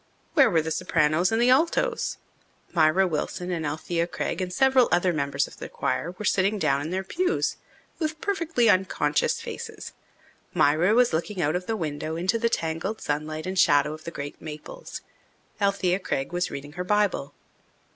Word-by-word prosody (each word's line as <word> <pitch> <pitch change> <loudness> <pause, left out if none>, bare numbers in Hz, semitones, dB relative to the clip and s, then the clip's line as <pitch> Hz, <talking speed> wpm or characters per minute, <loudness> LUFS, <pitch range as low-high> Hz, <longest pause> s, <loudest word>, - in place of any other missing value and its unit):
Where 280 -5 +6
were 165 -3 +2
the 160 - -3
sopranos 170 0 +2
and 225 - +1
the 245 +1 +4
altos? 340 - +1 0.6
Myra 170 +3 +4
Wilson 180 +2 -3
and 165 -3 -2
Alethea 165 +3 -2
Craig 185 - -3
and 180 -1 -3
several 265 +3 +4
other 175 +1 +3
members 140 -2 0
of - - -14
the - - -7
choir 175 +2 -2
were 210 - -5
sitting 200 +2 +2
down 140 -7 +1
in 150 - -4
their 190 +2 -2
pews 365 - 0 0.4
with 315 -1 -2
perfectly 330 - +1
unconscious 185 -7 +2
faces. - - -7 0.6
Myra 165 +8 +4
was 245 -6 +4
looking 180 +5 -2
out 155 -1 +1
of 180 0 -3
the 225 - -1
window 155 -2 -3
into 185 +7 0
the 230 0 +2
tangled 165 +3 -2
sunlight 155 +1 -3
and 185 0 -2
shadow 145 -3 +4
of 155 0 -10
the - - -5
great 145 -3 -7
maples. 160 - -8 0.6
Alethea 195 -2 +1
Craig 135 -4 -3
was 175 0 0
reading 145 +1 -7
her 180 +4 -4
Bible. 185 -8 0
180 Hz, 175 wpm, -26 LUFS, 155-215 Hz, 0.6 s, Where